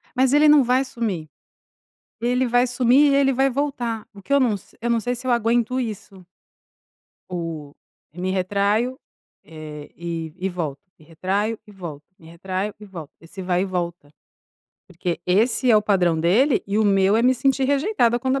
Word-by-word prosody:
Mas 260 0 +3
ele 300 +1 +5
não 295 -1 +7
vai 255 +2 +2
sumir. 220 - -4 0.9
Ele 250 +2 +1
vai 245 +1 +3
sumir 255 +4 +4
e - - +3
ele 270 -1 +3
vai 270 +2 +2
voltar, 245 -5 -3
o 200 - -13
que 235 - -12
eu 280 - +5
num 250 -5 +2
s 200 - -10
eu 235 - -1
não 235 - +2
sei 245 +2 -2
se 250 +2 -11
eu 255 - +1
aguento 235 +2 +1
isso. 205 -5 -6 1.1
O 165 -5 -5 0.4
e 175 - -10
me 185 +1 -1
retraio, 200 +6 0 0.5
eh, 155 -2 -10
e 165 -2 -5
e 190 +1 -1
volto, 165 -6 -4 0.2
me 155 - -19
retraio 195 +7 -2
e - - -15
volto, 165 -7 -8
me 160 - -17
retraio 190 +4 -4
e 210 - -10
volto, 170 -7 -9
esse 175 +4 -10
vai 180 0 0
e - - 0
volta. 175 -5 -4 0.8
Porque 175 -2 -4
esse 225 +7 +2
é 225 - +7
o 210 - +3
padrão 180 -6 +2
dele, 220 - +3
e 200 +1 -1
o 220 - +3
meu 195 0 +3
é 230 - +2
me 255 +1 +4
sentir 270 +1 +1
rejeitada 275 - +1
quando 260 +1 0
a - - -1
210 Hz, 190 wpm, -22 LUFS, 180-250 Hz, 1.1 s, não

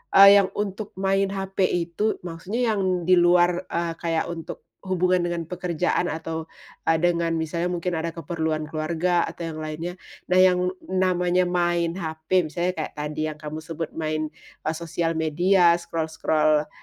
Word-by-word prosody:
eee, 200 +1 +10
yang 195 - +2
untuk 205 0 -4
main 195 +1 +1
HP 195 -1 -1
itu 175 +5 -1
maksudnya 195 +8 -2
yang 185 -4 0
di 180 +1 +5
luar, 175 +1 +3
e - - -2 0.2
kayak 165 0 -1
untuk 165 -1 -7 0.2
hubungan 185 -1 +1
dengan 170 -2 -2
pekerjaan 180 0 -1
atau, 160 0 -4 0.4
e - - +2
dengan 170 -1 +1
misalnya 170 +2 -2
mungkin 175 0 -2
ada 165 +1 -2
keperluan 160 -1 -3
keluarga 165 +3 0
atau 170 - -6
yang 155 -1 -6
lainnya, 160 +3 -4 0.3
nah 180 - +1
yang 180 -1 +5 0.3
namanya 180 -1 +2
main 175 -1 +1
HP 160 +1 0
misalnya 175 +4 0
kayak 155 - -4
tadi 155 +1 -2
yang 150 - -12
kamu 155 +1 -6
sebut 165 0 -6
main, 155 -1 -1 0.4
e - - -1
sosial 165 0 -2
media, 175 +3 +4
scroll 160 -2 -4
scroll 155 -1 +2
170 Hz, 155 wpm, -24 LUFS, 160-180 Hz, 0.4 s, eee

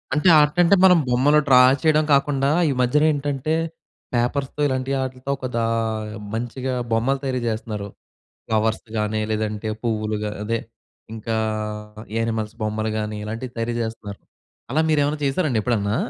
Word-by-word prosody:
అంటే 150 +5 +4
ఆర్టంటే 170 +5 +4
మనం 180 -2 +7
బొమ్మలు 140 +5 +4
డ్రా 130 -2 +7 0.2
చేయడం 155 -1 +3
కాకుండా, 140 -1 +2 0.2
ఈ - - +1
మధ్యనేంటంటే 145 +2 +1 0.6
పేపర్స్‌తో 130 +4 -1
ఇలాంటి 130 0 -2
ఆట్లితో 130 0 -5
ఒకదా 125 -3 -3 0.7
మంచిగా 120 +3 -3 0.2
బొమ్మలు 120 +5 +1
తయరి 130 -2 -1
చేస్తున్నారు. 110 -2 -3 0.6
ఫ్లవర్స్ 110 0 0
గానీ, 105 0 0
లేదంటే 110 0 -2
పువ్వులుగా 110 -2 -1
అదే 115 +2 -1 0.6
ఇంకా 110 +1 -3 0.8
యానిమల్స్ 110 -1 -2
బొమ్మలు 110 0 -1
గానీ 105 0 -3
ఇలాంటివి 115 +4 -6
తయరి 115 +1 -1
చేస్తున్నారు. 110 -3 -6 0.5
అలా 155 +4 +2
మీరేమైనా 150 -1 +2
చేసారండి 135 -4 +1
ఎప్పుడన్నా? 105 -2 0
120 Hz, 125 wpm, -22 LUFS, 110-140 Hz, 0.8 s, మనం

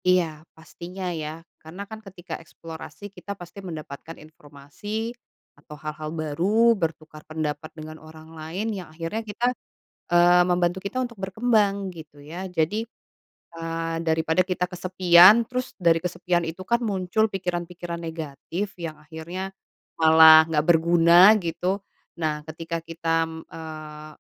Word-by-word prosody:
Iya, 180 -1 +5 0.3
pastinya 175 +4 -9 0.2
ya, 150 - -4 0.3
karena 165 +5 -9
kan 220 -1 -8
ketika 190 -4 -10
eksplorasi 165 +5 -10
kita 200 - -9
pasti 175 +2 -11
mendapatkan 160 -3 -8
informasi 155 +10 -7 0.5
atau 150 +1 -12
hal-hal 155 0 -6
baru, 200 +10 +3
bertukar 155 -1 -4
pendapat 155 0 -3
dengan 155 0 -8
orang 155 0 -14
lain, 170 +8 -4
yang 185 -5 -7
akhirnya 165 +7 -4
kita, 220 +2 -3 0.7
eee, 175 +1 +6
membantu 175 +1 +1
kita 200 +6 -4
untuk 235 -3 -8
berkembang 200 -2 +1
gitu 155 -3 -12
ya. 170 +6 -7
Jadi, 180 +5 0 0.8
eee, 165 0 -3
daripada 160 +3 +2
kita 180 -1 -1
kesepian, 185 +3 +6
terus 255 +1 -3
dari 165 -1 +5
kesepian 175 0 -1
itu 165 +3 -6
kan 235 - +4
muncul 210 -2 0
pikiran-pikiran 175 -3 -4
negatif 165 +4 -5
yang 165 -2 -5
akhirnya 170 +5 -6 0.5
malah 160 0 +8
nggak 155 -2 +1
berguna 170 +4 +7
gitu. 180 +4 -2 0.4
Nah, 150 -1 -2
ketika 165 +1 -5
kita, 165 0 -1 0.2
eee, 155 -1 -9
170 Hz, 130 wpm, -25 LUFS, 160-190 Hz, 0.8 s, malah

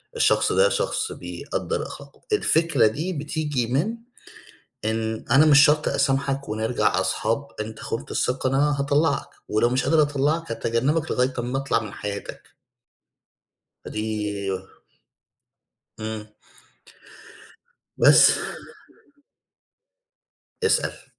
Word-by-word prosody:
الشخص 460 - +3
ده 485 0 +4
شخص 440 - -1
بيقدّر - - -4
أخلاقه." - - -12
الفكرة 165 - +3
دي 160 +12 -3
بتيجي 150 -5 -2
من 170 - -1 0.9
إن 110 0 -2
أنا 140 +5 +6
مش 145 0 +7
شرط 150 +1 +3
أسامحك 135 0 0
ونرجع 110 +3 0
أصحاب، - - -1
أنت 110 +1 -6
خُنت 115 - -5
الثقة 130 +1 0
أنا 140 +1 +1
هاطلّعك 145 0 +1 0.2
ولو 110 +3 +2
مش 130 +2 0
قادر 160 0 +4
أطلّعك، 150 +3 0
هاتجنّبك 130 +8 0
لغاية 125 +1 +1
أمّا 125 +2 -2
أطلع 135 -4 0
من 105 -2 -8
حياتك. 100 0 -7 1.3
دي 105 -2 -3 1.5
إمم. 110 -1 -5 1.7
بس. - - +7 2.2
أسأل. 445 - 0
135 Hz, 100 wpm, -24 LUFS, 110-150 Hz, 2.2 s, مش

